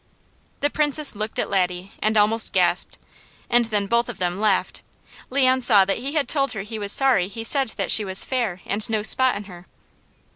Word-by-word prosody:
The 290 Hz, -, 0 dB
Princess 295 Hz, -3 st, +2 dB
looked 215 Hz, +1 st, -5 dB
at -, -, -1 dB
Laddie 180 Hz, 0 st, -2 dB
and 215 Hz, 0 st, 0 dB
almost 215 Hz, +2 st, +1 dB
gasped, -, -, 0 dB, 0.5 s
and 240 Hz, 0 st, +3 dB
then 210 Hz, -3 st, -2 dB
both 235 Hz, +3 st, 0 dB
of 245 Hz, -, -8 dB
them 180 Hz, +1 st, -3 dB
laughed. 210 Hz, -3 st, -1 dB, 0.5 s
Leon 260 Hz, -1 st, +1 dB
saw 210 Hz, -6 st, +5 dB
that 195 Hz, -, -2 dB
he 275 Hz, +3 st, -5 dB
had 300 Hz, -3 st, 0 dB
told 275 Hz, -4 st, -1 dB
her 195 Hz, -3 st, -6 dB
he 220 Hz, +1 st, -7 dB
was 200 Hz, -1 st, -3 dB
sorry 250 Hz, -10 st, +3 dB
he 225 Hz, +3 st, -8 dB
said 265 Hz, 0 st, +2 dB, 0.2 s
she 215 Hz, -, +6 dB
was 190 Hz, -1 st, +2 dB
"fair, 230 Hz, -9 st, -3 dB
and 210 Hz, +3 st, -2 dB
no 215 Hz, -2 st, -2 dB
spot 260 Hz, +3 st, +4 dB
in 205 Hz, -, -6 dB
her." 180 Hz, -3 st, -14 dB
220 Hz, 195 wpm, -22 LUFS, 200-255 Hz, 0.5 s, she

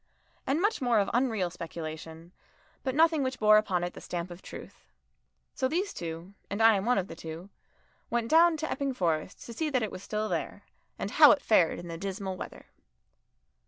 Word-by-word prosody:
And 275 Hz, +4 st, +1 dB
much 415 Hz, 0 st, +1 dB
more 245 Hz, -3 st, +2 dB
of 200 Hz, -, +1 dB
unreal 225 Hz, -8 st, +1 dB
speculation, 165 Hz, -1 st, -8 dB, 0.5 s
but 260 Hz, -1 st, -2 dB
nothing 320 Hz, -1 st, +4 dB
which 260 Hz, -1 st, -2 dB
bore 215 Hz, 0 st, +6 dB
upon 190 Hz, -5 st, +1 dB
it 175 Hz, -, -3 dB
the -, -, -10 dB
stamp 175 Hz, 0 st, -5 dB
of 175 Hz, +1 st, -10 dB
truth. -, -, -11 dB, 0.7 s
So 260 Hz, -, 0 dB
these 365 Hz, +8 st, -1 dB
two 170 Hz, +3 st, -7 dB, 0.2 s
and 200 Hz, -, -3 dB
I 225 Hz, 0 st, +7 dB
am 195 Hz, 0 st, -1 dB
one 250 Hz, -1 st, +3 dB
of 190 Hz, -1 st, -1 dB
the -, -, -9 dB
two 165 Hz, +5 st, -9 dB, 0.6 s
went 235 Hz, -1 st, 0 dB
down 325 Hz, +3 st, +5 dB
to 315 Hz, +1 st, -4 dB
Epping 275 Hz, -1 st, -2 dB
Forest 165 Hz, -3 st, -2 dB
to 235 Hz, -, -8 dB
see 310 Hz, +6 st, -2 dB
that 255 Hz, -5 st, +1 dB
it 215 Hz, -, -3 dB
was 185 Hz, -, -8 dB
still 215 Hz, +1 st, -2 dB
there, -, -, -4 dB, 0.3 s
and -, -, -4 dB
how -, -, +8 dB
it 285 Hz, -, -3 dB
fared 180 Hz, -7 st, +3 dB
in 175 Hz, -, -8 dB
the 165 Hz, -1 st, -6 dB
dismal 195 Hz, 0 st, -4 dB
weather. -, -, -9 dB
210 Hz, 200 wpm, -29 LUFS, 175-260 Hz, 0.7 s, how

